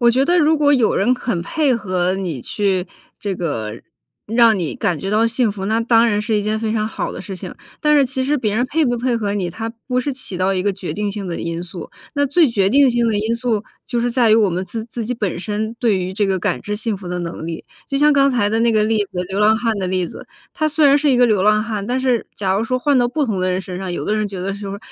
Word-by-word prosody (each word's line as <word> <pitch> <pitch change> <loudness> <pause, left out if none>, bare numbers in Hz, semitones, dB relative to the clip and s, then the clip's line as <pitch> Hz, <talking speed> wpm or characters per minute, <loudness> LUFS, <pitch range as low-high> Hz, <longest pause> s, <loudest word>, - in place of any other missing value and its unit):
我 240 -1 +5
觉 260 +3 +2
得 350 +3 +3
如 315 -1 +4
果 290 -1 +3
有 250 -6 +3
人 240 +6 +3
肯 235 -8 -2
配 280 - +1
合 185 -4 -1
你 180 -8 -3
去 190 -3 -1 0.3
这 200 -2 -2
个 115 -12 -4 0.5
让 230 -1 +4
你 170 -4 -2
感 180 -7 -1
觉 195 - -4
到 215 +2 +3
幸 230 0 +1
福， 200 -1 -6
那 220 +2 +1
当 230 0 +4
然 210 -2 +1
是 215 0 0
一 205 - 0
件 215 +1 -1
非 220 -1 -1
常 215 -1 0
好 - - -4
的 - - -7
事 195 - -7
情， 180 0 -7 0.3
但 300 0 +3
是 280 - +5
其 260 +1 -2
实 290 +3 +1
别 215 -5 -1
人 245 - +1
配 315 +4 +1
不 245 -3 +1
配 240 0 0
合 205 -3 -2
你， 195 -4 -1
它 225 +6 -5 0.2
不 250 -1 0
是 275 +2 -1
起 250 -8 -3
到 185 +2 +1
一 185 -1 0
个 205 - +1
决 190 -1 -6
定 210 0 -2
性 200 -1 -5
的 175 - -4
因 170 +1 -3
素， 180 0 -8 0.3
那 285 0 +2
最 315 +4 +4
决 195 -4 +2
定 275 +3 +5
性 240 -1 +1
的 220 - +1
因 220 +2 0
素 230 -3 -1 0.2
就 240 - -2
是 245 +1 0
在 235 -2 +3
于 - - +7
我 215 -3 +3
们 180 +2 -2
自 225 +1 -5
自 235 +1 -6
己 250 - -2
本 200 -7 -3
身 215 +3 -3
对 225 -5 +2
于 185 0 -3
这 205 +1 0
个 190 -1 0
感 - - -1
知 210 0 -4
幸 220 0 -1
福 190 -2 -8
的 180 0 -3
能 170 -2 -5
力。 165 -1 -6 0.2
就 275 - -1
像 295 +1 +4
刚 275 -1 +4
才 230 -5 +1
的 225 +1 +1
那 235 0 +3
个 215 -1 +3
例 220 0 +1
子， 180 -1 -4
流 195 - -1
浪 215 +1 +5
汉 230 -1 0
的 190 - -2
例 185 -1 0
子， - - -10 0.3
他 310 -3 0
虽 305 -1 +3
然 280 +1 +5
是 295 0 +2
一 255 - +3
个 245 - +5
流 210 -5 +2
浪 210 +1 +4
汉， 210 -3 -4
但 255 +1 0
是 255 -3 0
假 190 -2 -1
如 205 - +1
说 255 +3 -1
换 285 0 +2
到 245 -1 +2
不 290 +4 0
同 210 -7 -2
的 185 - +1
人 180 - 0
身 185 -1 -6
上， 190 -1 -4
有 175 - -3
的 210 - 0
人 215 -1 -1
觉 195 - -7
得 195 +2 -2
说 200 0 -6
215 Hz, 315 characters per minute, -19 LUFS, 195-245 Hz, 0.5 s, 于